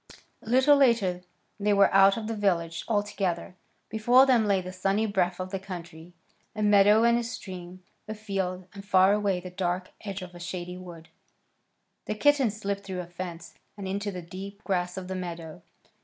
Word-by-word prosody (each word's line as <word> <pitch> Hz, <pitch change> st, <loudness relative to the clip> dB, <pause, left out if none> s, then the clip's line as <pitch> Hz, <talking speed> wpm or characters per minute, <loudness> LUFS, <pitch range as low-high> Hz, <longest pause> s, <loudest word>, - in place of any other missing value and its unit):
A -, -, -11 dB
little 265 Hz, +4 st, +5 dB
later 230 Hz, -10 st, +3 dB, 0.4 s
they 205 Hz, 0 st, +2 dB
were 200 Hz, -1 st, +4 dB
out 195 Hz, +1 st, +6 dB
of 225 Hz, -, -4 dB
the 225 Hz, +1 st, -3 dB
village 170 Hz, -5 st, 0 dB
altogether. 200 Hz, -4 st, -1 dB, 0.3 s
Before 240 Hz, +5 st, +5 dB
them 240 Hz, -5 st, +3 dB
lay 200 Hz, -2 st, +3 dB
the 185 Hz, 0 st, -7 dB
sunny 195 Hz, +4 st, 0 dB
breadth 185 Hz, -4 st, 0 dB
of 185 Hz, 0 st, -5 dB
the 195 Hz, -, -2 dB
country, 175 Hz, -2 st, -9 dB, 0.4 s
a 215 Hz, -, -2 dB
meadow 205 Hz, +1 st, +5 dB
and 235 Hz, 0 st, +4 dB
a -, -, -2 dB
stream, 185 Hz, -5 st, -8 dB, 0.2 s
a 215 Hz, -, -5 dB
field, 190 Hz, -4 st, -3 dB
and 200 Hz, -1 st, -9 dB
far 195 Hz, 0 st, +4 dB
away 200 Hz, -3 st, +1 dB
the 180 Hz, 0 st, -9 dB
dark 180 Hz, 0 st, -2 dB
edge 200 Hz, -2 st, -5 dB
of 180 Hz, -1 st, -10 dB
a 175 Hz, -, -11 dB
shady 175 Hz, 0 st, -5 dB
wood. 175 Hz, -3 st, -11 dB, 1.0 s
The 215 Hz, -, -3 dB
kittens 265 Hz, -4 st, +3 dB
slipped 200 Hz, -1 st, -3 dB
through 190 Hz, -2 st, -4 dB
a -, -, -8 dB
fence 175 Hz, -1 st, -8 dB, 0.2 s
and 195 Hz, -2 st, -6 dB
into 200 Hz, +2 st, -2 dB
the 180 Hz, -2 st, -7 dB
deep 195 Hz, +4 st, -9 dB
grass 180 Hz, -2 st, -1 dB
of 185 Hz, -1 st, -5 dB
the 190 Hz, -, -4 dB
meadow. 170 Hz, -3 st, -6 dB
195 Hz, 185 wpm, -27 LUFS, 180-210 Hz, 1.0 s, out